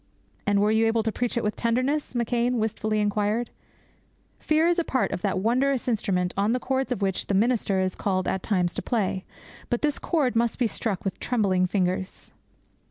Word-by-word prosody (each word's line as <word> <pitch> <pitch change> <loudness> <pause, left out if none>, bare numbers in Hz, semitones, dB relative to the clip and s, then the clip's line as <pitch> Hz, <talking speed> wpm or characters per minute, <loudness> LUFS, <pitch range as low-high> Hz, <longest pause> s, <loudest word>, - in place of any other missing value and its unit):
'And 205 0 +3
were 210 +1 +3
you 220 +1 +3
able 225 0 +1
to 220 - 0
preach 245 +2 -2
it 235 - 0
with 210 0 -1
tenderness?' 255 +5 0
McCheyne 240 +1 +1
wistfully 215 -1 -1
inquired. 210 +3 0 0.9
Fear 315 +2 +2
is 345 0 +2
part 260 - 0
of - - -3
that 195 -1 0
wondrous 255 +6 +1
instrument 185 -6 0
on 200 - +1
all - - +2
the 250 - 0
chords 265 0 -1
of 230 -5 -1
which 190 -1 -1
the 200 - +1
minister 210 -2 +2
is 185 -1 0
called 185 -2 -1
at 190 - -1
times 180 -4 0
to - - -3
play; 195 -5 -1 0.4
but 240 - -1
this 295 -1 +1
chord 285 -8 0
must 230 0 +1
be 250 - +1
struck 210 -3 -3
with 195 - -3
trembling 195 -7 +1
fingers. 185 0 -2
220 Hz, 195 wpm, -26 LUFS, 195-245 Hz, 0.9 s, And